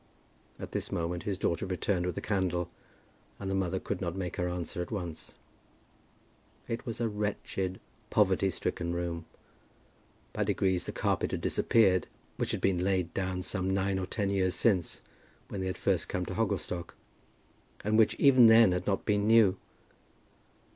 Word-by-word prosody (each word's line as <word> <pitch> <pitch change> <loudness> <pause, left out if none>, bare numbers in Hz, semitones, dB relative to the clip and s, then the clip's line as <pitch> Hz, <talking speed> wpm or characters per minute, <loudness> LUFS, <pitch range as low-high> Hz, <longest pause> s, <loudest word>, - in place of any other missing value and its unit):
At - - -7
this - - -3
moment 85 +1 -2
his 95 - -1
daughter 90 0 -1
returned 90 0 -1
with 90 - -3
a - - -2
candle, 90 -4 -1 0.7
and 95 -1 -3
the - - 0
mother 95 -1 0
could 100 0 -4
not 85 -2 -2
make 90 -2 -4
her 90 0 0
answer 90 0 -4
at 90 - -5
once. 90 -7 -6 1.3
It 115 +1 -4
was 115 - -4
a 120 - +1
wretched, 105 -3 -3 0.3
poverty 95 -2 +3
stricken 85 0 -2
room. 85 -1 -3 1.1
By - - 0
degrees 95 -2 0
the - - -2
carpet - - 0
had - - -3
disappeared, 95 -6 +3 0.3
which - - -1
had - - -2
been 95 -2 +2
laid 95 -3 0
down 95 -1 -2
some 95 0 -2
nine 95 0 0
or 95 - -3
ten 100 0 -1
years 95 -2 +1
since, 95 -8 +1 0.5
when 100 - -4
they 95 - -2
had 95 - -3
first - - 0
come - - -2
to - - -5
Hogglestock, 85 -1 -2 0.9
and 105 +1 +1
which 110 -1 +4
even 130 -4 +7
then 110 -3 +7
had 90 0 -2
not 100 -2 0
been 105 -1 +1
new. 110 -4 +6
95 Hz, 170 wpm, -30 LUFS, 90-100 Hz, 1.3 s, even